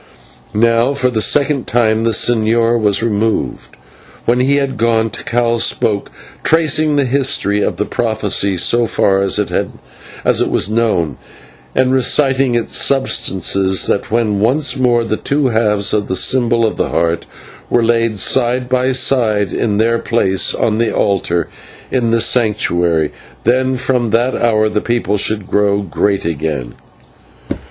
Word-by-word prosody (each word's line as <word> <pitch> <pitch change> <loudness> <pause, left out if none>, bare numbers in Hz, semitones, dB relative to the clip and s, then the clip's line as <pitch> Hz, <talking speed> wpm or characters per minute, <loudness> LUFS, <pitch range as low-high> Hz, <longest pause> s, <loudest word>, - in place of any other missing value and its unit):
Now 115 +4 +2
for 125 -2 0
the 110 -2 -1
second 145 +1 +1
time 110 -1 +1
the - - +2
señor 115 +1 +1
was 105 0 +1
removed, 110 0 -2
and - - -26
when 120 +1 +1
he 135 +3 +2
had 140 -2 -1
gone 115 -1 0
Tikal 120 0 -1
spoke, 105 -2 0 0.3
tracing 155 -1 +2
the 140 -1 +1
history 125 -6 0
of - - -2
the 105 - -1
prophecy 105 -4 -1
so 115 +7 +2
far 100 -3 +1
as 100 -1 0
it - - -2 1.0
was - - +1
known, 105 - -1 0.6
and 130 0 +2
reciting 130 0 +2
its 120 - -1
substance 130 -9 +1 0.3
that 100 - -2
when 110 -3 0
once 130 +5 +1
more 120 -3 +1
the 110 -1 -2
two 140 -2 -1
halves 105 -3 +1
of 105 -1 -1
the 95 - -2
symbol 120 +2 +2
of 110 - -2
the - - -1
Heart 85 +1 -1 0.4
were 120 - +2
laid 115 -1 +1
side 125 +4 +1
by 130 +1 0
side 110 -7 +1
in 105 -3 -1
their 115 +2 +1
place 95 -5 0
on 110 -1 -1
the 115 - 0
altar 85 -4 -1 0.4
in 120 -3 0
the 115 0 +1
Sanctuary, 85 - +1 0.3
then 130 +2 +1
from 125 -2 -1
that 120 +4 +1
hour 110 -2 +1
the 105 0 -2
people 120 -4 -1
should 105 0 -1
grow 100 0 0
great 100 +1 -1
again. 75 -6 -3
115 Hz, 150 wpm, -15 LUFS, 105-125 Hz, 1.0 s, Now